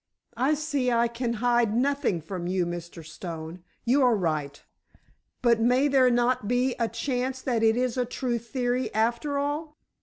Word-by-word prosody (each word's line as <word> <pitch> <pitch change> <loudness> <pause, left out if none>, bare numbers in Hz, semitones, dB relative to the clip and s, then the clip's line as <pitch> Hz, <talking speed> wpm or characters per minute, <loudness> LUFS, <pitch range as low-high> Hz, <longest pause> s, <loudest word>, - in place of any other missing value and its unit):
"I 270 +5 +2
see 290 -4 -1
I 235 0 +3
can 235 0 -3
hide 235 -1 +2
nothing 270 - +1
from 175 +2 -5
you, 180 -1 0
Mr. 170 -1 -7
Stone! 165 +1 -7 0.2
You 260 +4 +3
are 250 -3 +4
right—but 165 - -3
may 250 +5 +3
there 265 -2 +5
not 240 -2 +1
be 245 +2 +1
a 230 - +2
chance 260 +1 -2
that 240 -4 0
it 225 +1 +3
is 250 0 0
a 250 - +1
true 245 -1 -2
theory 245 +2 -2
after 235 +6 0
all?" 300 +2 -3
240 Hz, 160 wpm, -26 LUFS, 210-255 Hz, 0.2 s, there